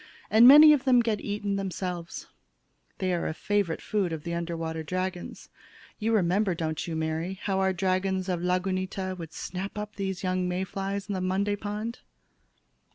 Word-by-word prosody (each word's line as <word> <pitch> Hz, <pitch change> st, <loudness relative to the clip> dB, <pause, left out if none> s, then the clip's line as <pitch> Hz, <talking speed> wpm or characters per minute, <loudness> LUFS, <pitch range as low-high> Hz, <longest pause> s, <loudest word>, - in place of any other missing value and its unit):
And 225 Hz, +3 st, +8 dB
many 300 Hz, +3 st, +10 dB
of 280 Hz, -3 st, +1 dB
them 255 Hz, -2 st, +5 dB
get 225 Hz, -3 st, -1 dB
eaten 205 Hz, -1 st, -2 dB
themselves. 180 Hz, -3 st, -4 dB, 0.7 s
They 185 Hz, -1 st, -1 dB
are 170 Hz, -, -1 dB
favorite 200 Hz, -1 st, -1 dB
food 200 Hz, -5 st, -1 dB
of 160 Hz, -2 st, -5 dB
the 170 Hz, -, -4 dB
under 170 Hz, 0 st, -3 dB
water 160 Hz, 0 st, -3 dB
dragons. 185 Hz, +2 st, -4 dB, 0.5 s
You 225 Hz, +1 st, 0 dB
remember, 190 Hz, 0 st, +2 dB
don't 160 Hz, -1 st, -3 dB
you, 165 Hz, -, -3 dB
Mary, 160 Hz, +4 st, -2 dB
how 195 Hz, -1 st, 0 dB
our 190 Hz, 0 st, +2 dB
dragons 185 Hz, 0 st, 0 dB
of 180 Hz, -2 st, -1 dB
Lagunita 185 Hz, +1 st, -1 dB
would 165 Hz, -2 st, -7 dB
snap 190 Hz, +5 st, -6 dB
up 210 Hz, +1 st, -6 dB
the 195 Hz, -1 st, -2 dB
young 185 Hz, -1 st, -1 dB
May 180 Hz, +1 st, -1 dB
flies 195 Hz, +1 st, -4 dB
in 190 Hz, -3 st, -2 dB
Monday 195 Hz, +2 st, 0 dB
Pond? 210 Hz, +3 st, -5 dB
185 Hz, 165 wpm, -27 LUFS, 175-205 Hz, 0.7 s, many